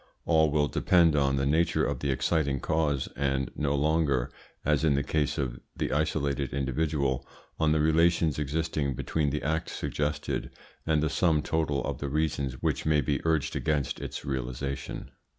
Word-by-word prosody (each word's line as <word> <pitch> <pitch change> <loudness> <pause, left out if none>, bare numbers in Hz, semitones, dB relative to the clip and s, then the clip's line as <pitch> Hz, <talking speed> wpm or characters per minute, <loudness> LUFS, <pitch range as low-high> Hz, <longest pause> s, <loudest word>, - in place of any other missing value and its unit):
All 80 -2 +4
will 75 0 +2
depend 85 -1 +3
on 70 -2 +2
the 70 0 0
nature 80 +4 +2
of 70 -3 -2
the 70 - -2
exciting 70 +1 +1
cause, 75 -4 0
and 70 -1 -1
no 70 -1 0
longer, 70 -4 +1 0.3
as 75 +1 +2
in 75 -3 +3
the 70 - +1
case 75 +1 0
of - - -2 0.2
the - - -2
isolated 70 -3 0
individual, 70 -1 0 0.4
on 80 -1 +3
the 80 - +3
relations 80 0 +3
existing 75 -1 -1
between 75 +3 0
the 75 +2 -3
act 80 +2 -1
suggested 75 0 -2 0.4
and 80 -1 +2
the - - +2
sum 80 -4 +2
total 75 -4 0
of - - -3
the 70 - -3
reasons 70 -3 -1
which - - 0
may 75 -1 +3
be 70 +1 -1
urged 80 -3 +1
against 75 -4 -1
its - - -6
realisation. 65 +1 -4
75 Hz, 170 wpm, -28 LUFS, 70-80 Hz, 0.4 s, All